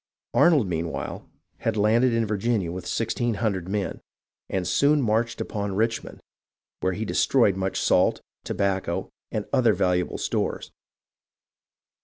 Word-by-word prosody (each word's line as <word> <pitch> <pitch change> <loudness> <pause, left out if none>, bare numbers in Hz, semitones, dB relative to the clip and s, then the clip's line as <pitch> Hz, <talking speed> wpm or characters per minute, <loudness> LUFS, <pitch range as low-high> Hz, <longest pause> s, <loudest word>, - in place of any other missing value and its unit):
Arnold, 155 -9 +5
meanwhile, 85 -3 -4 0.3
had 115 -1 -1
landed 115 +4 +4
in 115 -1 +1
Virginia 105 -3 0
with 90 0 -6
1600 110 -5 -1
men, 100 -1 -2 0.5
and 90 -2 -1
soon 140 +11 +3
marched 115 -1 0
upon 100 -2 -3
Richmond, 115 +2 -1 0.6
where 95 0 0
he 110 +5 -3
de - - -4
stroyed 115 -8 +3
much 95 0 -2
salt, - - +3 0.2
tobacco, 95 -3 -1 0.2
and 105 - -2
other 120 -6 +4
valuable 90 -1 0
stores. - - -2
105 Hz, 125 wpm, -25 LUFS, 95-115 Hz, 0.6 s, Arnold